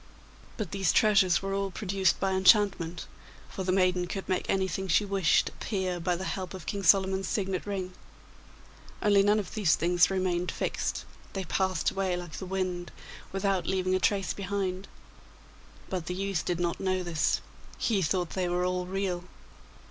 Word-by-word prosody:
But 210 -7 -4
these 195 -4 +1
treasures 195 -4 +4
were 195 0 -2
all 195 0 -1
produced 190 0 0
by 195 - 0
enchantment, 190 -3 +3 0.4
for 190 - -5
the 185 - 0
maiden 180 -1 +2
could 195 +1 -5
make 185 -1 -1
anything 190 0 0
she 190 +4 +3
wished 195 -5 +2
appear 185 -4 -3
by 175 +1 0
the 180 - -5
help 190 -1 -4
of 185 - -9
King 200 - -3
Solomon's 190 +1 +3
signet 195 -2 -2
ring; 190 -2 -3 1.1
only 205 -1 +5
none 205 +2 +4
of 205 -4 -4
these 205 -7 +3
things 175 0 +3
remained 185 -2 0
fixed; - - -2 0.3
they 195 - -3
passed 185 -1 0
away 190 -2 -1
like 175 -2 -7
the 190 - -6
wind 185 -2 -2 0.4
without 195 -1 0
leaving 185 -1 0
a 185 - +2
trace 195 0 +1
behind. 195 -1 -3 1.0
But 180 -4 -4
the 180 - -2
youth 195 -3 -2
did 175 -1 -1
not 175 -1 -1
know 185 -1 0
this; 170 -3 +1 0.4
he 210 -5 +1
thought 175 +1 0
they 185 -2 -1
were 180 +1 0
all 180 0 -1
real. 185 -2 -2
190 Hz, 170 wpm, -29 LUFS, 180-195 Hz, 1.1 s, only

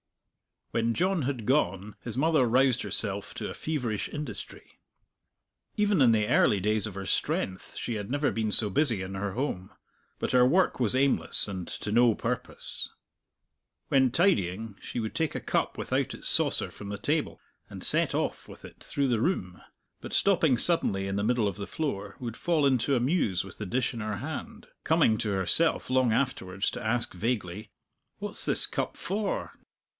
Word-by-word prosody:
When 115 0 0
John 185 +2 +1
had 125 -4 -3
gone 105 -6 0
his 115 0 -5
mother 155 -3 +3
roused 125 +1 +3
herself 100 0 -2
to - - -4
a - - -5
feverish 125 -9 -3
industry. 150 0 -7 1.0
Even 210 -6 +2
in 120 -3 +6
the 105 -1 +1
early 105 -4 +3
days 105 +1 0
of 100 - -8
her 100 0 -5
strength 95 0 -2
she 120 - -3
had 105 0 -5
never 145 +2 0
been 110 -1 -1
so 105 - +7
busy 115 -3 +2
in 95 +1 -6
her 95 0 -3
home. 100 -7 -3 0.5
But - - -2
her 125 -1 +5
work 180 +6 +2
was 120 -1 +2
aimless 130 -13 +2
and 95 -4 -5
to 105 - -4
no 120 0 +4
purpose. - - -3 1.0
When 130 -2 +4
tidying 110 - +1
she - - -5
would 110 - -4
take 160 -3 -1
a - - -3
cup - - -1
without - - -1
its - - -3
saucer - - +2
from 100 - -10
the 100 0 -4
table, 150 +9 -1 0.3
and - - -8
set - - +3
off - - -2
with - - -13
it - - -13
through 140 -2 -1
the 115 -3 +1
room, 95 - -2 0.4
but - - -9
stopping 165 -10 +3
suddenly 100 - +1
in 95 0 -2
the 100 - -1
middle 115 -2 +2
of 100 - -8
the 100 - -5
floor, 105 -10 -4
would 120 -2 -6
fall 165 -4 +1
into 135 0 +2
a - - +2
muse 120 - +1
with 95 -2 -11
the 105 - -4
dish 125 +6 -1
in 115 - -6
her 105 -1 -3
hand; - - -7 0.2
coming 110 - +3
to 105 - -1
herself 100 - +3
long 130 -3 +3
afterwards 100 -7 -1
to 125 - -6
ask 120 +2 -1
vaguely, 105 -1 -3 0.5
"What's - - -1
this - - +6
cup - - -3
for?... 200 +2 -3
115 Hz, 180 wpm, -28 LUFS, 100-140 Hz, 1.0 s, so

